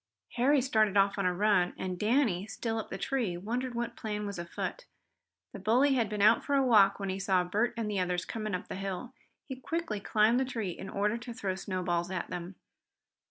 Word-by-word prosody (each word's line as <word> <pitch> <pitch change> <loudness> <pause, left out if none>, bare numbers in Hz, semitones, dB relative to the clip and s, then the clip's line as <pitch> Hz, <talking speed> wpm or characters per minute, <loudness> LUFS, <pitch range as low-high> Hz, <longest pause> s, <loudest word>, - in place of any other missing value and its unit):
Harry 265 +3 +3
started 215 -6 +2
off 200 +1 +3
on 190 - +2
a - - +2
run, 195 -2 +2
and 185 -1 -4
Danny, 215 -5 +2
still 225 0 -3
up 220 - -6
the - - -5
tree, 215 -4 -1
wondered 240 +6 -3
what 235 0 -3
plan 210 -1 -4
was 200 -3 -5
afoot. 175 - -5 0.7
The 200 - -7
bully 245 +8 +3
had 235 -5 +1
been 210 -1 -1
out 220 +2 +5
for 285 - 0
a 270 -1 +3
walk 210 -6 +5
when 195 -1 -3
he 190 +1 -2
saw 190 -2 +2
Bert 215 +7 0
and 225 -2 -2
the 205 -2 -1
others 180 0 -1
coming 215 -3 -3
up 180 - -6
the - - -5
hill. 195 +6 -5 0.3
He 265 - -6
quickly 290 -5 -3
climbed 215 +4 +3
the - - +2
tree 225 -7 -3
in 190 +3 -8
order 210 +4 0
to 240 0 -7
throw 200 -6 -2
snowballs 180 -2 -2
at 185 -2 -4
them. 175 +2 -5
210 Hz, 215 wpm, -30 LUFS, 190-240 Hz, 0.7 s, out